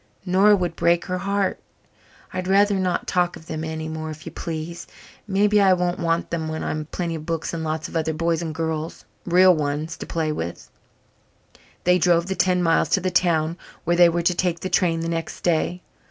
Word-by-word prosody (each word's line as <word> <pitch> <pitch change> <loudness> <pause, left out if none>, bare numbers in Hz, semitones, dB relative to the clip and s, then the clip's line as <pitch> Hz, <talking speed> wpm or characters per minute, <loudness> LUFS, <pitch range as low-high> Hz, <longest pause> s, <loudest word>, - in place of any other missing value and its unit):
Nora 195 +3 +5
would 175 -4 -2
break 170 0 +2
her 185 0 -2
heart. 200 0 -1 0.7
I'd 185 0 -3
rather 200 +2 +4
not 185 -2 0
talk 180 -1 +1
of 160 - -13
them 160 -1 -5
anymore, 160 0 -4
if 155 0 -9
you - - -6
please. 165 +1 -6 0.4
Maybe 205 +1 +3
I 190 -1 +6
won't 180 -1 0
want 165 0 -1
them 165 -2 -2
when 160 0 -4
I've 155 0 -3
plenty 170 -2 -3
of 155 -1 -7
books 165 -1 -2
and 165 -1 -3
lots 155 0 -2
of - - -12
other 160 -1 0
boys 165 +1 0
and 165 -2 -3
girls 160 -6 -3 0.2
real 185 +1 +6
ones 150 +1 -2
to - - -8
play 160 -2 -1
with." 85 - -6 1.1
They 180 +1 +4
drove 170 -1 +3
the 190 +1 -3
ten 180 0 +2
miles 165 -1 +2
to - - +3
the 185 0 -2
town 170 -2 +1 0.2
where 175 +1 +1
they 175 0 +7
were 170 0 -1
to 180 - +3
take 175 -1 -1
the 185 - -3
train 165 -3 +2
the 165 - -3
next 165 -1 -4
day. 175 +1 0
170 Hz, 205 wpm, -23 LUFS, 160-180 Hz, 1.1 s, they